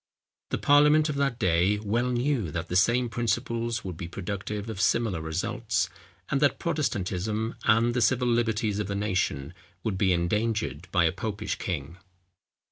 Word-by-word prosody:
The - - -1
parliament 150 +2 +5
of 150 - -2
that 135 -4 0
day 95 +2 +2
well 110 +4 0
knew 125 - 0
that 80 +2 -4
the 90 - -2
same 120 +6 +3
principles 115 0 -1
would 90 -4 -6
be 85 -1 -5
productive 100 +3 -5
of 110 -3 -4
similar 95 -3 +1
results, 100 +4 -1 0.4
and 140 - +1
that 145 - +3
Protestantism, 110 - -1
and 115 +2 +4
the 125 - 0
civil 125 +1 +2
liberties 110 -3 +1
of 105 - -2
the 100 - -3
nation, 90 -7 -1 0.3
would 100 -4 -2
be 95 -2 +3
endangered 90 - -1
by 90 -3 +3
a 80 - +3
popish 105 +1 -4
king. 85 -1 -4
105 Hz, 160 wpm, -27 LUFS, 90-120 Hz, 0.4 s, parliament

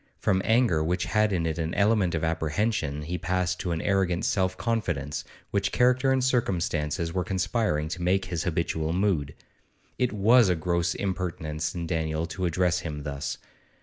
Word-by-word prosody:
From 95 -2 +1
anger 110 -9 +3
which 90 +3 0
had 105 -1 +2
in 85 -4 0
it 80 0 -2
an 80 +1 -2
element 100 -4 +2
of 80 - -2
apprehension 80 -1 -1
he 90 +4 -3
passed 90 0 -1
to 90 - -2
an 85 0 -2
arrogant 95 -3 +1
self 95 -2 +1
confidence 90 - -2 0.3
which 100 0 0
character 125 +1 +3
and 130 -1 +2
circumstances 85 - 0
were 90 -1 0
conspiring 95 -5 0
to 90 +1 -5
make 90 +2 +2
his 85 -3 -3
habitual 80 -1 -1
mood. 90 -7 0 0.6
It 125 -1 +2
was 110 +2 +5
a 90 - +3
gross 85 +1 0
impertinence 85 -5 -3
in 85 -1 -3
Daniel 80 -1 -1
to 90 +1 -2
address 90 +1 +1
him 75 -4 -5
thus. 70 0 -4
90 Hz, 170 wpm, -27 LUFS, 80-100 Hz, 0.6 s, was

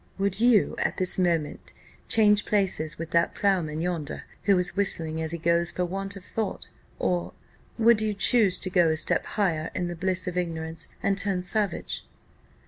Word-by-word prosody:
Would 200 0 -1
you, 235 -3 +4
at - - -1
this 185 0 +2
instant, 170 -4 -1 0.3
change 210 -2 +4
places 180 -6 +1
with 165 0 -6
that 170 0 +1
ploughman 170 -6 0
yonder, 170 -4 -3 0.2
who 200 -2 +4
is 180 -1 -1
whistling 160 -5 -1
as 160 0 -3
he 170 - -3
goes 170 +1 +1
for 180 - -2
want 195 +2 -5
of 190 -2 -11
thought? 220 -3 -4 0.3
or, 175 -1 -1 0.4
would 230 -1 +4
you 215 -1 -1
choose 205 -2 +4
to 185 - -2
go 175 -3 +4
a 160 - 0
step - - +2
higher 165 -6 0
in 175 -1 -2
the 175 - -5
bliss 185 +1 -1
of 180 0 -4
ignorance, 165 -2 -3 0.2
and 195 0 +2
turn 190 -3 -1
savage?" 205 +2 -1
180 Hz, 180 wpm, -26 LUFS, 170-200 Hz, 0.4 s, you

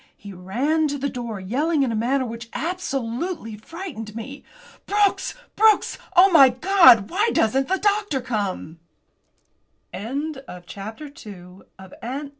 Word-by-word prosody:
He 200 -1 -11
ran 255 - 0
to 285 0 -3
the 280 +1 -2
door 235 -5 -5
yelling 280 - 0
in 255 - 0
a - - -2
manner 255 +4 0
which 230 0 -8
absolutely 280 - -4
frightened 225 - -8
me. 270 +5 -8 0.4
"Brooks! 410 -1 +1 0.2
Brooks! 435 0 +3 0.2
Oh, 380 +2 +7
my 275 -6 +8
God, 255 - +5
why 415 +6 +1
doesn't 265 +5 +1
the 380 - +1
doctor 410 -7 0
come?" 200 -9 -4 1.1
CHAPTER - - -6 0.2
III. 315 - -4 0.3
DOCTORS 220 - -9
TO 190 - -13
THE 190 -1 -13
RESCUE! 275 +5 -5
265 Hz, 140 wpm, -22 LUFS, 220-330 Hz, 1.1 s, my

